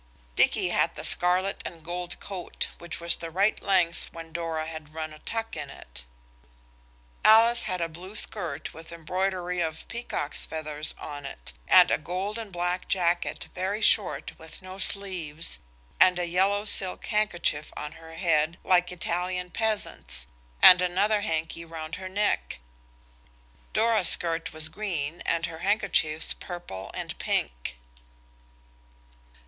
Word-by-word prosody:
Dicky -, -, +3 dB
had -, -, +1 dB
the -, -, -6 dB
scarlet 180 Hz, +2 st, +3 dB
and 165 Hz, -2 st, -8 dB
gold 175 Hz, +1 st, -5 dB
coat, 185 Hz, -4 st, -4 dB
which 170 Hz, -1 st, -6 dB
was 170 Hz, 0 st, +4 dB
the 165 Hz, -, -6 dB
right 195 Hz, +6 st, +2 dB
length 180 Hz, -4 st, +1 dB
when 165 Hz, -1 st, -9 dB
Dora 165 Hz, -1 st, -2 dB
had 155 Hz, -1 st, -8 dB
run 155 Hz, -1 st, -4 dB
a 155 Hz, -, -13 dB
tuck 225 Hz, +5 st, -4 dB
in 145 Hz, -3 st, -5 dB
it. -, -, -11 dB, 1.2 s
Alice 230 Hz, +2 st, +6 dB
had 185 Hz, -1 st, -2 dB
a 170 Hz, -, +1 dB
blue 180 Hz, +5 st, -10 dB
skirt 175 Hz, -9 st, -2 dB
with 160 Hz, +1 st, -10 dB
embroidery 180 Hz, +2 st, -2 dB
of 160 Hz, -2 st, -3 dB
peacock's 235 Hz, -11 st, -2 dB
feathers 155 Hz, -1 st, -3 dB
on 145 Hz, -1 st, -7 dB
it, -, -, -8 dB
and -, -, +7 dB
a -, -, +2 dB
gold 190 Hz, +7 st, -3 dB
and 220 Hz, -3 st, -7 dB
black 180 Hz, +1 st, -2 dB
jacket 175 Hz, -2 st, 0 dB
very 190 Hz, +3 st, -2 dB
short 215 Hz, -2 st, +2 dB
with 160 Hz, +3 st, -11 dB
no 185 Hz, +1 st, -9 dB
sleeves, 180 Hz, -6 st, -1 dB, 0.4 s
and 185 Hz, -1 st, +6 dB
a 175 Hz, -, 0 dB
yellow 195 Hz, +4 st, +1 dB
silk 190 Hz, -3 st, -1 dB
handkerchief 175 Hz, -8 st, 0 dB
on 150 Hz, 0 st, -5 dB
her 165 Hz, 0 st, -12 dB
head 165 Hz, -1 st, +1 dB
like 180 Hz, -1 st, +3 dB
Italian 180 Hz, +1 st, -2 dB
peasants, 185 Hz, -, +1 dB, 0.3 s
and 180 Hz, -1 st, +11 dB
another 205 Hz, +4 st, +2 dB
handkie 165 Hz, -1 st, -2 dB
round 160 Hz, -1 st, -6 dB
her 185 Hz, -, -6 dB
neck. 190 Hz, -, 0 dB, 1.1 s
Dora's 220 Hz, -4 st, +3 dB
skirt 165 Hz, -1 st, +2 dB
was 155 Hz, 0 st, -1 dB
green 160 Hz, -3 st, -3 dB
and 170 Hz, 0 st, +1 dB
her 165 Hz, -1 st, -7 dB
handkerchiefs 185 Hz, -5 st, +2 dB
purple 95 Hz, -, -7 dB
and -, -, -5 dB
pink. -, -, -1 dB
175 Hz, 140 wpm, -27 LUFS, 160-190 Hz, 1.2 s, and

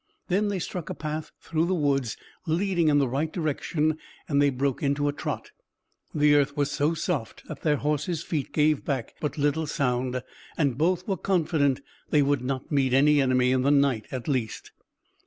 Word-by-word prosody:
Then 200 Hz, +3 st, +2 dB
they 200 Hz, -1 st, -1 dB
struck 180 Hz, -1 st, -5 dB
a -, -, -4 dB
path 155 Hz, 0 st, -4 dB
through 165 Hz, +1 st, -1 dB
the 185 Hz, -, +1 dB
woods 140 Hz, -7 st, 0 dB, 0.3 s
leading 175 Hz, 0 st, +1 dB
in 145 Hz, -1 st, +4 dB
the 140 Hz, -2 st, +3 dB
right 145 Hz, +6 st, -1 dB
direction, 155 Hz, -1 st, -1 dB, 0.3 s
and 140 Hz, -1 st, +2 dB
they 145 Hz, -, +5 dB
broke 135 Hz, 0 st, -1 dB
into 145 Hz, 0 st, +1 dB
a 145 Hz, -, 0 dB
trot. -, -, -5 dB, 0.6 s
The 150 Hz, -1 st, +5 dB
earth 145 Hz, 0 st, +2 dB
was 145 Hz, -1 st, +1 dB
so 150 Hz, +4 st, +1 dB
soft 155 Hz, -8 st, -3 dB
that -, -, -8 dB
their 150 Hz, -2 st, +2 dB
horses' 150 Hz, +3 st, -1 dB
feet 150 Hz, -5 st, -3 dB
gave 150 Hz, -1 st, +2 dB
back 130 Hz, -5 st, -3 dB
but 150 Hz, -, -2 dB
little 145 Hz, +2 st, +1 dB
sound, 125 Hz, -3 st, -1 dB, 0.3 s
and 140 Hz, -6 st, +1 dB
both 175 Hz, +5 st, +1 dB
were 195 Hz, -2 st, 0 dB
confident 160 Hz, -7 st, +1 dB, 0.3 s
they 150 Hz, -1 st, +4 dB
would 140 Hz, -2 st, +1 dB
not 130 Hz, +2 st, -4 dB
meet 135 Hz, -3 st, +2 dB
any 145 Hz, +1 st, +5 dB
enemy 130 Hz, -1 st, +3 dB
in 130 Hz, 0 st, +2 dB
the 135 Hz, -, +2 dB
night 140 Hz, -6 st, +2 dB
at 130 Hz, -3 st, -5 dB
least. 125 Hz, -7 st, -2 dB
145 Hz, 190 wpm, -26 LUFS, 135-155 Hz, 0.6 s, they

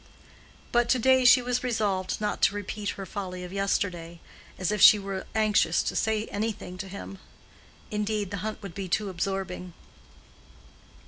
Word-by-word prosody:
But 240 Hz, 0 st, +2 dB
to 255 Hz, -, +4 dB
day 260 Hz, +1 st, +4 dB
she 255 Hz, 0 st, +7 dB
was 250 Hz, 0 st, -1 dB
resolved 210 Hz, -6 st, -1 dB
not 210 Hz, -1 st, -2 dB
to 200 Hz, -, +4 dB
repeat 205 Hz, 0 st, -4 dB
her 195 Hz, -, -5 dB
folly 185 Hz, -1 st, -6 dB
of 180 Hz, +1 st, -8 dB
yesterday, 180 Hz, -4 st, -2 dB, 0.4 s
as 185 Hz, 0 st, -1 dB
if 210 Hz, -2 st, -1 dB
she 215 Hz, -, +10 dB
were 195 Hz, -1 st, -5 dB
anxious 210 Hz, -6 st, +3 dB
to -, -, -3 dB
say 220 Hz, 0 st, 0 dB
anything 205 Hz, -3 st, -3 dB
to 195 Hz, -, -5 dB
him. 195 Hz, 0 st, -8 dB, 0.7 s
Indeed, 210 Hz, -2 st, -2 dB
the 200 Hz, -, -3 dB
hunt 215 Hz, +3 st, -5 dB
would 195 Hz, -4 st, -7 dB
be 195 Hz, +1 st, -5 dB
too 205 Hz, +3 st, 0 dB
absorbing. 185 Hz, -1 st, -4 dB
200 Hz, 160 wpm, -27 LUFS, 185-215 Hz, 0.7 s, she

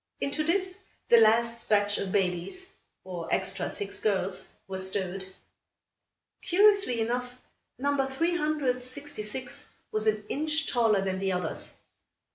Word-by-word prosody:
Into 280 Hz, +2 st, 0 dB
this, 370 Hz, +3 st, 0 dB, 0.3 s
the 235 Hz, -, +8 dB
last 230 Hz, +1 st, +3 dB
batch 205 Hz, -1 st, +3 dB
of 190 Hz, -, -3 dB
babies, 195 Hz, -, -1 dB, 0.3 s
or 175 Hz, -3 st, -6 dB
extra 190 Hz, 0 st, 0 dB
six 200 Hz, -1 st, -2 dB
girls, 190 Hz, -3 st, 0 dB, 0.2 s
were 190 Hz, -1 st, -4 dB
stowed. 190 Hz, 0 st, -1 dB, 1.1 s
Curiously 395 Hz, -, +4 dB
enough, 245 Hz, +2 st, -2 dB, 0.4 s
number 275 Hz, 0 st, +1 dB
366 265 Hz, -5 st, -2 dB, 0.2 s
was 215 Hz, 0 st, -1 dB
an 215 Hz, -1 st, +2 dB
inch 310 Hz, +2 st, 0 dB
taller 225 Hz, -5 st, +3 dB
than 190 Hz, -1 st, -1 dB
the 195 Hz, 0 st, 0 dB
others. 180 Hz, -3 st, -2 dB
230 Hz, 115 wpm, -29 LUFS, 195-285 Hz, 1.1 s, the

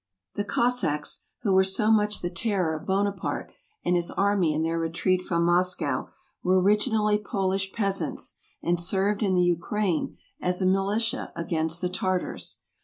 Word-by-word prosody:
The 205 Hz, -, -2 dB
Cossacks, 205 Hz, -10 st, +1 dB, 0.2 s
who 200 Hz, -4 st, +2 dB
were 190 Hz, 0 st, +6 dB
so 195 Hz, +3 st, +2 dB
much 210 Hz, -1 st, +2 dB
the 175 Hz, -, -2 dB
terror 185 Hz, -3 st, 0 dB
of 155 Hz, -, -6 dB
Buonaparte 200 Hz, +1 st, -1 dB, 0.3 s
and 180 Hz, -, +2 dB
his 175 Hz, -1 st, 0 dB
army 200 Hz, -5 st, +2 dB
in 155 Hz, +1 st, 0 dB
their 165 Hz, +1 st, 0 dB
retreat 170 Hz, +3 st, 0 dB
from 170 Hz, -2 st, 0 dB
Moscow, 180 Hz, +1 st, +1 dB, 0.3 s
were 185 Hz, +1 st, +3 dB
originally 210 Hz, +2 st, +2 dB
Polish 195 Hz, -2 st, -1 dB
peasants, 195 Hz, -3 st, -2 dB, 0.3 s
and 170 Hz, 0 st, +1 dB
served 200 Hz, +4 st, +1 dB
in 195 Hz, -3 st, +2 dB
the 180 Hz, -, +4 dB
Ukraine 175 Hz, +1 st, 0 dB, 0.2 s
as 180 Hz, 0 st, 0 dB
a 190 Hz, -, +1 dB
militia 205 Hz, +6 st, 0 dB
against 165 Hz, 0 st, -1 dB
the 180 Hz, -, 0 dB
Tartars. 185 Hz, 0 st, -3 dB
190 Hz, 155 wpm, -26 LUFS, 175-205 Hz, 0.3 s, were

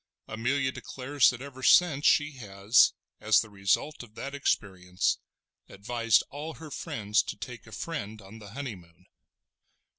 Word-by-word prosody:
Amelia 130 Hz, +4 st, 0 dB
declares 135 Hz, +2 st, +1 dB
that 125 Hz, +1 st, -5 dB
ever 135 Hz, -2 st, -10 dB
since 150 Hz, 0 st, +5 dB
she 150 Hz, 0 st, +4 dB
has, 100 Hz, 0 st, +4 dB, 0.3 s
as 110 Hz, 0 st, +4 dB
the 110 Hz, -, -9 dB
result 100 Hz, +9 st, 0 dB
of 110 Hz, -3 st, -14 dB
that 140 Hz, +4 st, -6 dB
experience, 95 Hz, -9 st, -1 dB, 0.5 s
advised 115 Hz, +3 st, +1 dB
all 150 Hz, +3 st, -6 dB
her 155 Hz, -2 st, -10 dB
friends 105 Hz, -4 st, 0 dB
to -, -, -7 dB
take 115 Hz, +3 st, -9 dB
a -, -, -13 dB
friend 110 Hz, -8 st, -5 dB
on 100 Hz, +2 st, -12 dB
the 105 Hz, -1 st, -12 dB
honeymoon. 95 Hz, -, -8 dB
115 Hz, 145 wpm, -28 LUFS, 100-140 Hz, 0.5 s, since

